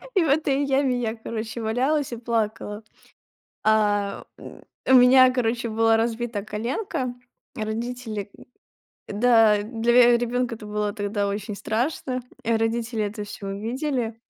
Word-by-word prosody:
И 365 - +4
в - - 0
этой 285 -1 +2
яме 270 -2 +1
я, 225 -1 -2
короче, 225 0 -5
валялась 260 +6 0
и 235 - -4
плакала. 220 -2 -2 0.8
А, 205 -2 +1
м, - - -12 0.3
у 260 - +6
меня, 255 +1 +7
короче, 235 -1 -1
была 225 0 +3
разбита 230 -2 -2
коленка. 245 - -3 0.4
А 220 - -2
родители 220 -2 -4
м, - - -15 0.8
да, 225 -4 +5
для 230 +2 0
ве 240 -1 +7
ребёнка 245 0 -1
это 215 - -11
было 210 0 -2
тогда 205 -1 -2
очень 205 +1 -4
страшно. 255 +3 -2 0.2
А 230 0 +2
родители 225 0 -1
это 210 +1 -5
всё 205 -1 -8
увидели. 230 +3 -3
230 Hz, 145 wpm, -24 LUFS, 215-250 Hz, 0.8 s, меня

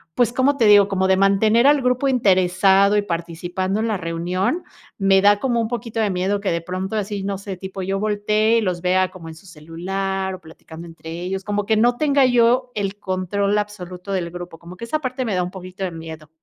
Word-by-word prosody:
pues, 240 -1 +2
¿cómo 275 +3 +2
te 230 - +3
digo? 205 -1 +7
Como 190 -1 0
de 190 0 +3
mantener 215 +5 +4
al 290 -1 +4
grupo 250 +2 +1
interesado 195 -3 +3
y - - +3
participando 175 +2 -3
en 225 - 0
la 215 - -1
reunión, 180 - -2 0.3
me 195 -1 +4
da 205 0 +5
como 240 -2 0
un 225 - -1
poquito 230 -1 -4
de 215 -2 +1
miedo 190 +2 -1
que 200 - -1
de 170 - -1
pronto 185 +4 -4
así, 205 -1 -3
no 200 0 -2
sé, 195 -1 -7
tipo 190 +1 -7
yo 195 +1 -2
voltee, 215 +2 +1
y - - +2
los 180 -4 -2
vea 185 +1 +1
como 170 -3 -11
en 160 - -10
su 165 - -17
celular, 190 +4 -4
o 185 - -14
platicando 160 0 -12
entre 165 -1 -10
ellos, 180 +3 -4
como 205 0 -2
que 220 -1 +2
no 240 +2 +3
tenga 280 -2 +3
yo 245 +1 +3
el 200 -1 -3
control 200 +2 -1
absoluto 195 -2 -5
del 175 -3 -2
grupo, 175 -1 -8
como 175 +2 -12
que 235 - -7
esa 305 +7 -2
parte 255 -2 -3
me 215 -5 -1
da 180 - +1
un 180 - -5
poquito 185 0 -8
de 185 - -2
miedo. 160 -2 -9
195 Hz, 225 wpm, -21 LUFS, 180-215 Hz, 0.3 s, digo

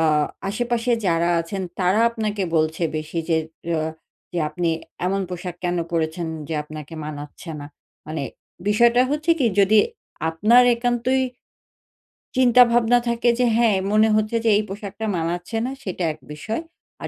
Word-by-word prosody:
আ - - +3 0.5
আশেপাশে 240 +3 0
যারা 170 0 +2
আছেন 190 +4 -4 0.2
তারা 185 +4 +3
আপনাকে 215 -3 -2
বলছে 155 +2 0
বেশি 155 +2 -4
যে 165 - +3 0.4
আ - - 0 0.5
যে 175 - -2
আপনি 175 +1 -2 0.4
এমন 195 +2 0
পোশাক 180 0 -5
কেন 175 0 0
পড়েছেন 165 0 -1 0.2
যে 165 - -2
আপনাকে 155 +1 -9
মানাচ্ছে 150 +2 -8
না। 145 - -7 0.4
মানে 155 -1 -4 0.5
বিষয়টা 235 +4 +5
হচ্ছে 305 +3 0
কি 260 - +2
যদি 210 +2 +5 0.5
আপনার 215 +10 +5
একান্তই 245 +2 +1 1.2
চিন্তাভাবনা 240 -1 +5
থাকে 235 +1 +2
যে 250 - +4
হ্যাঁ, 230 -3 +4 0.2
মনে 215 +1 +4
হচ্ছে 215 +2 +1
যে - - +5
এই 215 - +1
পোশাকটা 205 +2 -6
মানাচ্ছে 175 +5 -3
না 255 - -3
সেটা 185 -2 -4
এক 155 - -18
বিষয়। 215 - -4 0.4
আর - - -4
200 Hz, 150 wpm, -22 LUFS, 165-235 Hz, 1.2 s, বিষয়টা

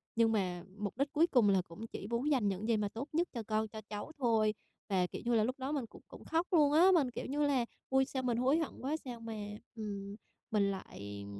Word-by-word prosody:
nhưng 230 -1 +4
mà 180 -5 0
mục 210 +1 -4
đích 280 +1 0
cuối 325 +3 +5
cùng 245 -10 +4
là 190 -2 +4
cũng 190 +7 -9
chỉ 200 - -7
muốn 235 +6 0
dành 245 -7 +3
những 200 +3 -1
gì 230 - +3
mà 210 -1 0
tốt 235 +7 -5
nhất 340 +3 +2
cho 235 -3 -3
con, 215 0 +1
cho 215 +1 -8
cháu 210 +8 -5
thôi. 225 -4 +3 0.4
Và, 185 -2 +2
kiểu - - -7
như 240 0 +3
là, 215 - +4
lúc 255 +4 -2
đó 265 +2 -2
mình 280 -5 -1
cũng 220 - -15
cũng - - -12
khóc 330 +3 +1
luôn 300 -4 +6
á, 360 +5 +7
mình 275 -7 +3
kiểu - - -5
như 295 +2 0
là: 260 -4 +2 0.2
"Ôi, 265 0 +4
sao 260 -1 -3
mình 240 -2 +1
hối 265 +5 +3
hận 320 -6 -4
quá! 280 +4 0
Sao 240 -2 -6
mà, 230 -1 -6 0.4
ừm, 200 -2 -5 0.4
mình 200 -2 +3
lại, 100 - -7
230 Hz, 255 wpm, -34 LUFS, 205-275 Hz, 0.4 s, á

